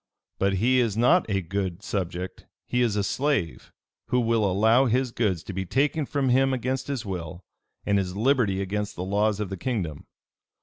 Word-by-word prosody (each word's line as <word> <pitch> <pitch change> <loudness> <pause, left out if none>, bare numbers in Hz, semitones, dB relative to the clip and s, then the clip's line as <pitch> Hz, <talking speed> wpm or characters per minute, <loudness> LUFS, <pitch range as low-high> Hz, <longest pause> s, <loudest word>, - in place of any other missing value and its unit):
But 95 0 +2
he 120 +7 +3
is 115 -4 0
not 125 +6 +4
a 100 -2 0
good 95 +1 -3
subject, 90 -2 -4 0.2
he 125 - 0
is 115 -4 +2
a 105 - +1
slave, 130 - -1 0.4
who 125 - +2
will 115 -3 +2
allow 110 +7 +4
his 125 +1 +1
goods 95 -8 0
to 100 - -7
be 95 +1 -2
taken 145 - 0
from 140 -3 0
him 135 +1 +3
against 130 +2 -2
his 135 -5 -3
will, 90 -2 -6 0.4
and 100 -1 +2
his 90 -1 -3
liberty 110 -5 +2
against 105 +2 -3
the 90 - -4
laws 105 +2 +1
of 105 -3 -3
the 95 - -4
kingdom. 90 - -3
105 Hz, 185 wpm, -26 LUFS, 95-125 Hz, 0.4 s, not